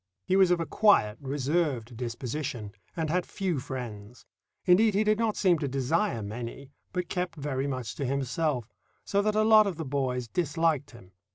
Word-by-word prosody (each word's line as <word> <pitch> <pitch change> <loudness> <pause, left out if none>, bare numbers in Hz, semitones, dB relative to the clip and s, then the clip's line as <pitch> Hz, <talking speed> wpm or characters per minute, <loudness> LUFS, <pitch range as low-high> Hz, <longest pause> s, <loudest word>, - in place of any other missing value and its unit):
He 185 - +2
was 190 -2 +6
of 180 -1 +3
a 165 - -1
quiet, 160 - +3
reserved 135 -3 -1
disposition, 120 -1 -4 0.3
and 160 -2 -1
had 180 +1 +1
few 180 -6 -2
friends. 125 -4 -7 0.4
Indeed, 200 +3 +5
he 210 - +3
did 215 0 +2
not 225 -2 0
seem 180 -5 +3
to 145 - -1
desire 135 - 0
many, 120 +6 -7 0.2
but 180 -1 -2
kept 180 -1 -2
very 140 -2 -2
much 130 -5 -3
to 140 - -2
himself, 135 -1 -1 0.4
so 200 - +1
that 210 +1 0
a 215 - +4
lot 215 -1 +7
of 190 - -2
the 160 0 -5
boys 130 -3 -1
disliked 160 -1 0
him. 115 -7 -15
145 Hz, 180 wpm, -28 LUFS, 125-180 Hz, 0.4 s, lot